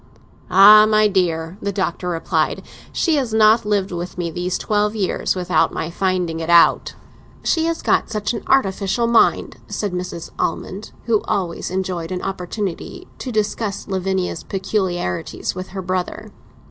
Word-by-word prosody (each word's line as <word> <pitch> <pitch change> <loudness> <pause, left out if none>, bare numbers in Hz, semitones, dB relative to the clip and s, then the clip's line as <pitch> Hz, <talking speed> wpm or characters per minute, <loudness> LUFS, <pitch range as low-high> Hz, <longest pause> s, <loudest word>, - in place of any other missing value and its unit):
"Ah, 210 +3 +8
my 215 0 +4
dear," 175 -2 -1
the 200 - -2
Doctor 185 -2 -2
replied, 165 -2 -1 0.3
"she 325 -3 +1
has 245 -6 -1
not 220 0 +5
lived 200 -2 0
with 175 +1 -5
me 170 -2 -2
these 180 +2 -2
twelve 210 0 0
years 195 -2 -1
without 180 -1 +1
my 160 - -4
finding 180 -3 -1
it 165 0 -4
out!" 170 0 +4 0.5
"She 325 -1 +1
has 330 0 -2
got - - +2
such 215 0 -2
an 230 - -4
artificial 200 -3 +1
mind," 230 -1 +2
said 205 -2 -3
Mrs. 180 -2 -5
Almond, 190 +5 -3
who 225 -3 +2
always 185 -5 -2
enjoyed 185 -2 -3
an 180 -1 -4
opportunity 190 0 -5
to 255 - -5
discuss 215 -1 -2
Lavinia's 190 -2 -2
peculiarities 185 - -2
with 185 0 -6
her 190 0 -6
brother. 185 0 -3
190 Hz, 150 wpm, -20 LUFS, 180-215 Hz, 0.5 s, Ah